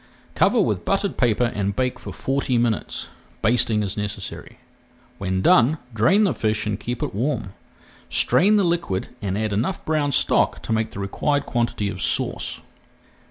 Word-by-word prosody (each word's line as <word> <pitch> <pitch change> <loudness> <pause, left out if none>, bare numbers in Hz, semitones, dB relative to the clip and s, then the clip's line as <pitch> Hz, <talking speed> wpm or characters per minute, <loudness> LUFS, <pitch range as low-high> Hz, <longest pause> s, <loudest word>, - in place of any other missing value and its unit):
Cover - - +3
with - - +1
buttered 195 0 0
paper 120 -2 +2
and 100 -1 -1
bake 125 +1 -1
for - - -8
forty 135 -2 -1
minutes, 115 -2 -1 0.3
basting 110 -2 +2
as 100 -1 -3
necessary. 105 -1 -6 0.6
When 95 -1 -1
done, 135 +7 +5 0.2
drain 180 - +4
the 195 - +2
fish 110 -1 -1
and 105 -1 -2
keep 120 +2 -4
it - - -3
warm. 110 -3 -2 0.6
Strain 205 +4 +4
the 205 - +4
liquid 170 - -1
and 95 -1 -2
add 110 -1 -1
enough 115 - -2
brown 150 -2 +1
stock - - +2
to 115 - -2
make 110 0 0
the - - -9
required 145 +9 -1
quantity 120 -4 -1
of 95 -2 -5
sauce. - - -1
115 Hz, 160 wpm, -23 LUFS, 105-145 Hz, 0.6 s, done